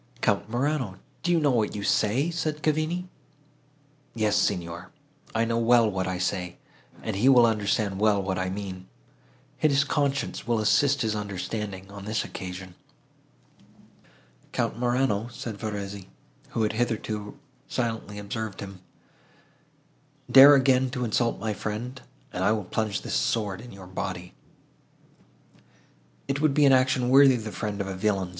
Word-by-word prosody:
"Count - - 0
Morano! 125 -4 -1 0.2
do 175 - 0
you 170 - +4
know 145 -3 +3
what 110 -5 0
you 100 - -4
say?" 125 +12 +1
said 155 -2 -3
Cavigni. 155 +4 0 1.1
"Yes, 110 -2 +1
Signor, 85 -4 -1 0.5
I 115 +1 +2
know 115 0 0
well 115 0 +5
what 95 -1 -2
I 95 0 -2
say, 90 -1 -2 0.5
and - - -3
he 115 +7 +4
will 125 -3 +7
understand 105 -2 0
well 105 -1 +3
what 95 -1 -2
I 95 0 -1
mean. 95 -1 -6 0.7
His 140 -2 +3
conscience 140 -3 -1
will 120 -1 +2
assist 135 +6 +3
his 110 -1 0
understanding, 100 -1 -5
on 100 -1 -9
this 110 +1 -1
occasion." 90 0 -7 1.8
"Count - - -1
Morano," 120 -3 +1
said 115 -3 -7
Verezzi, 100 -3 -5 0.4
who 115 - -1
had 105 - 0
hitherto 110 -2 -2 0.3
silently 115 -4 -3
observed 105 0 -5
him, 95 -2 -8 1.5
"dare 140 +2 +10
again 130 -1 +3
to 125 -1 -3
insult 115 +1 0
my 110 +1 -2
friend, 115 +6 -5 0.3
and 90 - -2
I 105 - +4
will 110 -2 -2
plunge 110 +1 -2
this - - -4
sword 105 -3 0
in 125 - -11
your 95 -1 -11
body." 90 -1 -5 1.9
"It 140 +1 -1
would 155 -3 +2
be 150 - +5
an 135 - +6
action 130 -1 +3
worthy 135 0 +7
the 110 -2 -5
friend 105 -1 -4
of 100 - -1
a 95 - -4
villain!" 95 -1 0
110 Hz, 150 wpm, -26 LUFS, 100-130 Hz, 1.9 s, dare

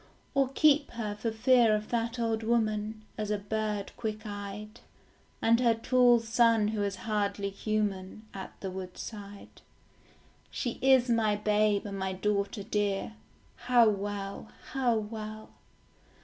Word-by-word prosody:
Or 275 -1 +2
keep 295 -1 +4
her 220 -3 -3
for 225 +2 -2
fear 235 -1 +4
of 210 0 -4
that 230 0 -1
old 225 -1 0
woman, 215 -1 0 0.2
As 210 -1 -2
a 210 - +1
bird 210 0 -3
quick 215 -1 -4
eyed, 205 +1 -7 0.6
And 230 +1 +5
her 235 -2 +4
tall 245 +1 +4
son 230 -2 +3
who 215 -1 -2
is 200 -1 -1
hardly 200 -2 -1
human, 205 -1 -2
At 190 -1 -8
the 190 - -4
woodside? 200 +2 -8 0.9
She 240 - -4
is 260 -1 +5
my 225 -3 +2
babe 210 0 +2
and 200 -1 -5
my 190 0 -2
daughter 200 +2 -1
dear, 205 +1 -1 0.5
How 240 -3 +6
well, 200 0 -4 0.3
how 255 -4 +2
well. 215 0 -6
215 Hz, 135 wpm, -30 LUFS, 205-230 Hz, 0.9 s, How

